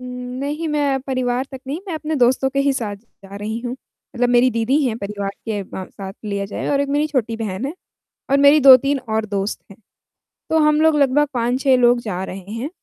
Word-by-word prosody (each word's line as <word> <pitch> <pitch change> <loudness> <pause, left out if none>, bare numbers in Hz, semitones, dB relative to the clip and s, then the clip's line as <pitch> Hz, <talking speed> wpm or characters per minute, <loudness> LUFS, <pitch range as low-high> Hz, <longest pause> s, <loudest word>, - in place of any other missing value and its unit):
उम्म, 250 0 -7
नहीं, 300 +4 -3
मैं 285 -3 0
परिवार 255 -1 -1
तक 265 - -7
नहीं, 290 +5 -3
मैं 340 - -3
अपने 315 0 -3
दोस्तों 260 +1 +3
के 275 - -2
ही 280 - +4
साथ 215 -6 -3
जा 200 -2 -15
रही 215 +2 -4
हूँ। 245 0 -4
मतलब 245 -1 -5
मेरी 245 +1 +4
दीदी 230 +4 +1
हैं 225 -3 -1
परिवार 200 0 -4 0.2
के 205 -2 -2
म 190 - -4
साथ 195 -1 -8
लिया 200 -1 -2
जाए - - -5
और 280 -1 +2
1 280 - -1
मेरी 295 +2 +1
छोटी 240 -6 -1
बहन 220 +2 -4
है, 285 - -4 0.6
और 280 - +5
मेरी 285 +2 +6
2-3 275 +1 +6
और 220 0 0
दोस्त 200 -1 -3
हैं। - - -14 0.7
तो 320 - +3
हम 300 +1 +3
लोग 320 -1 +4
लगभग 285 +2 +3
5-6 255 +3 +2
लोग 240 0 +4
जा 190 -4 -4
रहे 190 +1 -8
हैं। 235 +6 -4
250 Hz, 215 wpm, -20 LUFS, 215-280 Hz, 0.7 s, मेरी